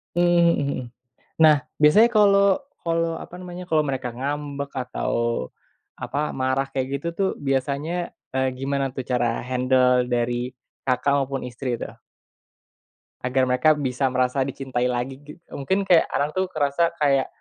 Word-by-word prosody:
Mmm, 175 - +3
mhm 170 -1 +4
mhm, 140 -2 -2 0.6
nah 155 -3 +6 0.2
biasanya 205 +11 +6
kalau 200 -2 +5 0.2
kalau 165 -1 0
apa - - -11
namanya 180 0 -8
kalau 155 -1 +2
mereka 130 -2 -2
ngambek 140 +1 -4
atau, 120 - -2 0.5
apa 150 +1 -2
marah 130 +1 0
kayak 130 -1 -2
gitu 170 - -8
tuh 195 0 +1
biasanya, 145 +5 -2 0.2
eee, 130 0 +1
gimana 135 0 -1
tuh 130 - -3
cara 120 -2 0
handle 125 0 +2
dari, 120 +1 -1 0.3
Kakak, 130 +2 +2
maupun 135 0 -3
istri 125 0 -4
tuh? - - -8 1.3
Agar 130 0 +1
mereka 125 +5 +3
bisa 135 -2 -1
merasa 130 +1 +1
dicintai 130 -2 -2
lagi 125 +2 -2
gi 145 +1 -12 0.2
mungkin 190 +9 -1
kayak 175 -3 +6
anak 150 +5 -1
tuh 190 - +2
ngerasa 155 +3 +1
kayak, 135 -2 +3
135 Hz, 145 wpm, -23 LUFS, 130-155 Hz, 1.3 s, nah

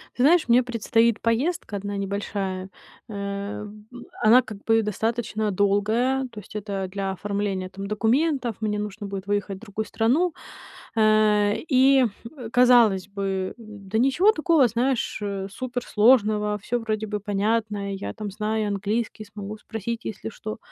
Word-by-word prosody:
Ты 250 - +1
знаешь, 325 +1 +5
мне 245 +2 +5
предстоит 230 -1 +1
поездка 235 +2 0
одна 200 0 -4
небольшая. 195 -1 -3 0.4
Э, 200 0 -4
б 215 +4 -12 0.2
она 230 +4 +7
как 215 -4 -10
бы 225 0 +3
достаточно 220 0 -1
долгая, 215 +7 +1
то 215 - -8
есть 210 - -14
это 200 -2 -3
для 195 0 -2
оформления 200 -1 -3
там 195 +1 -7
документов. 240 +3 +1
Мне 210 -1 -1
нужно 210 0 -5
будет 195 -1 -6
выехать 205 -1 -1
в - - -15
другую 220 0 -4
страну. 285 +13 +1 0.6
Э, 215 -1 +4
и 265 -1 +5 0.5
казалось 240 -7 +5
бы, 195 -2 -3
да 215 -2 -6
ничего 275 - +4
такого, 320 - +3
знаешь, 240 +2 -1
э, 200 -2 -3
суперсложного, 215 -2 +2
всё 240 +4 -1
вроде 220 -1 -2
бы 210 0 -3
понятно. 205 0 -1
Я, 195 - -5
там, 210 -2 -6
знаю 215 +1 -1
английский, 210 +2 -2
смогу 210 0 -8
спросить, 225 +2 -5
если 220 +1 -5
что. 215 0 -7
215 Hz, 145 wpm, -24 LUFS, 200-235 Hz, 0.6 s, она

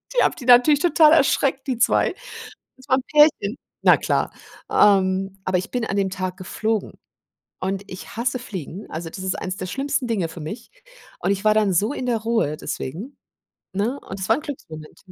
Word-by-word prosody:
Die - - +4
habe - - +2
die 250 - -10
natürlich 250 +4 +6
total 320 -2 +5
erschreckt, 275 -2 +2
die 255 -3 -1
2. - - +2 0.6
Das 260 - -18
war 260 - +5
'n 260 - -3
Pärchen. 295 -7 +4 0.3
Na - - +7
klar. - - 0 0.4
Ähm, 195 -1 +3
aber 185 0 +1
ich - - -7
bin 245 -2 -1
an 200 - -2
dem 195 -1 +1
Tag 185 -1 -4
geflogen 215 +3 -2 0.7
und 195 +1 -3
ich 185 - -9
hasse 245 +2 0
fliegen. 190 - -8
Also, 165 +1 -5
das 190 - -9
ist 190 - -1
eines 185 0 -4
der 185 - -4
schlimmsten 275 +2 -2
Dinge 200 -8 0
für 165 - -9
mich. 215 +10 -7 0.5
Und - - 0
ich 200 +1 -2
war 215 - +6
dann 205 -3 +2
so 210 - +1
in 255 - -4
der 235 -2 +1
Ruhe 225 -9 0
deswegen, 160 - -6 0.6
ne, 225 +8 -1
und 190 0 -8
es 190 - -4
war 225 - +4
'n 300 - -6
Glücksmoment. 160 - -9
210 Hz, 200 wpm, -22 LUFS, 185-255 Hz, 0.7 s, Na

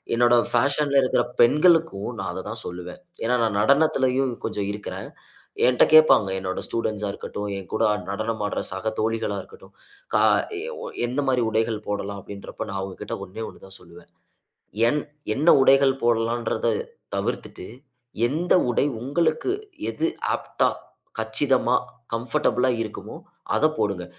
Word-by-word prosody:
என்னோட 120 +1 +5 0.2
ஃபேஷன்‌ல 140 +3 +2
இருக்குற 130 - +2 0.2
பெண்களுக்கும் 155 - +4
நான் 95 - -3
அத 95 - -5
தான் 110 0 -6
சொல்லுவேன். 90 - -7 0.3
ஏன்னா 125 +2 +2
நான் 110 -3 0
நடனத்திலயும் 135 -1 +3
கொஞ்சம் 100 -1 -2
இருக்குறேன். 105 0 -6 0.6
என்ட்ட 125 - +4
கேட்பாங்க, 155 -10 +7
என்னோட 95 0 -3
ஸ்டூடண்ட்ஸா 105 -3 -2
இருக்கட்டும், 105 +1 -5
என் 95 -2 -9
கூட - - +1 0.3
நடனம் 110 +1 -2
ஆடுற - - -3
சக 105 +4 -2
தோழிகளா 110 -2 -1
இருக்கட்டும், 95 +1 -17 0.4
க - - +6 0.4
எ - - -6 0.2
ஒ - - -5 0.2
"எந்த 130 +4 -1
மாரி 125 -2 +2
உடைகள் 110 -1 -1
போடலாம்?" 100 -1 -3
அப்டின்றப்ப 100 +2 -7
நான் 100 - -3
அவுங்ககிட்ட 95 -1 -5
ஒண்ணே 100 +4 -7
1 - - -15
தான் 95 0 -10
சொல்லுவேன். 85 0 -16 0.8
என் 150 +2 0 0.3
என்ன 155 +5 +1 0.2
உடைகள் 135 0 +4
போடலான்றத 115 0 +1 0.5
தவிர்த்துட்டு, - - -4 0.6
எந்த 170 +4 +1 0.2
உடை 120 - +2 0.2
உங்களுக்கு 155 - 0 0.4
எது 165 - -1 0.3
ஆப்ட்‌டா, - - 0 0.5
கச்சிதமா, 120 +3 +1 0.4
கம்ஃபர்டபிளா 125 +2 +2
இருக்குமோ, 110 -2 -7 0.4
அத - - +2
போடுங்க. 100 -7 -1
115 Hz, 135 wpm, -24 LUFS, 100-135 Hz, 0.8 s, கேட்பாங்க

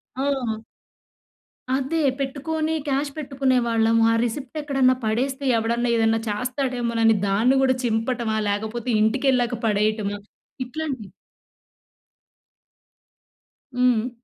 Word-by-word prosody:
ఆ! 260 -5 -1 1.2
అదే 275 +5 -1 0.2
పెట్టుకొని 310 +4 -2
క్యాష్ 280 +1 0
పెట్టుకునేవాళ్ళము. 245 -6 +2
ఆ - - +3
రిసిప్ట్ 260 +5 -4
ఎక్కడన్నా 270 -3 +2
పడేస్తే, 260 +5 -1
ఎవడన్నా 235 +2 0
ఏదన్నా 225 0 +2
చేస్తాడేమోనని 240 -1 0
దాన్ని 225 +7 +3
కూడా 260 -1 +3
చింపటమా, 230 -1 0
లేకపోతే 220 +4 -3
ఇంటికెళ్ళాక 245 +1 +1
పడేయటమా 210 -1 0 0.5
ఇట్లాంటివి 260 -6 -5 2.7
హ్మ్. 250 -1 +2
245 Hz, 85 wpm, -23 LUFS, 225-270 Hz, 2.7 s, ఆ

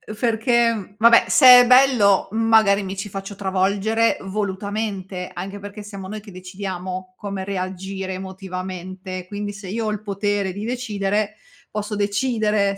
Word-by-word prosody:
perché 230 -2 +1
vabbè, 230 +1 +6
se 275 - +4 0.2
è 245 - +2
bello, 250 -6 +5
magari 220 -2 +4
mi 195 0 -6
ci 195 - -4
faccio 195 +1 -7
travolgere 200 +4 +1
volutamente, 195 -1 -4
anche 195 +3 -6
perché 205 +1 -9
siamo 200 -2 -8
noi 215 +2 -6
che 205 -1 -13
decidiamo 185 0 -6
come 200 -2 -5
reagire 190 0 -4
emotivamente, 185 -1 -7
quindi 205 +1 -5
se 200 -1 -10
io 220 +4 -3
ho 215 - 0
il 210 -1 -4
potere 200 -1 -1
di 205 +3 -5
decidere, 215 -4 -2 0.3
posso 210 0 -4
decidere 205 -1 0
200 Hz, 140 wpm, -22 LUFS, 190-215 Hz, 0.3 s, vabbè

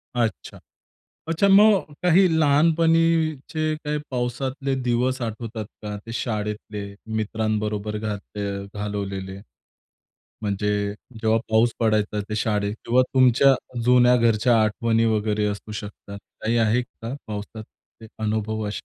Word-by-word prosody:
अच्छा. 115 -3 -2 0.7
अच्छा 165 +4 +2
मग 200 -1 +6 0.2
काही 180 +2 +5
लहानपणीचे 160 0 +2
काही 150 -1 -3
पावसातले 130 +2 -2
दिवस 125 +2 0
आठवतात 110 -1 -4 0.2
का? 105 -1 -5
ते 115 - -7
शाळेतले, 105 -2 -3 0.3
मित्रांबरोबर 110 -1 -2
घालत 105 -1 -6 0.4
घालवलेले? 100 -2 -4 1.0
म्हणजे 105 -1 -1 0.5
जेव्हा 110 0 +3
पाऊस 110 +2 +3
पडायचा 105 -2 +1
ते 110 - -2
शाळेत 105 -1 0
किंवा 125 +2 +4
तुमच्या 130 +1 +5 0.3
जुन्या 125 0 +6
घरच्या 115 0 +3
आठवणी 115 +1 +1
वगैरे 105 -1 +1
असू 105 +1 -5
शकतात. 105 -1 -8 0.2
काही 115 +2 +1
आहेत 115 +2 +2 0.2
का, 115 +3 -4
पावसातले 110 +1 -9 0.2
अनुभव 110 0 -1
असे? 105 - -4
110 Hz, 110 wpm, -23 LUFS, 105-130 Hz, 1.0 s, मग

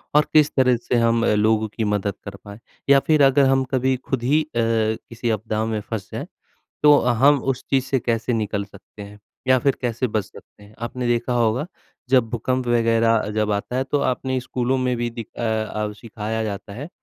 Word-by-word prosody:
और 150 - +5
किस 150 -1 +5
तरह 130 -2 +4
से 120 +1 -2
हम 115 0 +2
अ, - - +3
लोगों 110 +1 +2
की 110 +2 -4
मदद 105 -1 -1
कर - - -7
पाएँ 100 +2 -10 0.3
या 140 0 +7
फिर 155 -3 +4
अगर 135 0 +5
हम 135 0 +3
कभी 130 0 +1
खुद 130 -1 -4
ही 150 +5 +3
अ, - - -15
किसी 115 +1 -1
आपदा 110 0 -1
में 110 -1 -2
फँस 105 -2 -6
जाए, - - -5 0.6
तो 150 -1 +7
अ, 125 - +1
हम 140 +4 +4
उस 125 - -13
चीज़ 135 -2 +2
से 135 - 0
कैसे 115 +1 -1
निकल 105 -2 -1
सकते 100 +1 -15
हैं, 105 +1 -11 0.3
या 130 -1 +5
फिर 135 +1 +1
कैसे 120 +1 -1
बच 105 -2 -1
सकते 105 - -17
हैं। 105 +1 -17
आपने 120 +1 -4
देखा 120 +1 0
होगा 120 +4 +1 0.4
जब 125 -4 +3
भूकंप 125 +2 -2
वगैरह 115 -1 +3
अ, 105 - -2
जब 105 0 0
आता 105 +4 -2
है 130 - +1
तो 140 +2 -1
आपने 130 +1 -2
स्कूलों 130 +1 -1
में 125 -1 0
भी 120 0 -1
दिख 115 -1 -8
अ - - -4
अ, 110 -1 -2
सिखाया 110 0 -5
जाता 100 -1 -5
है 145 +9 -7
115 Hz, 215 wpm, -22 LUFS, 110-130 Hz, 0.6 s, या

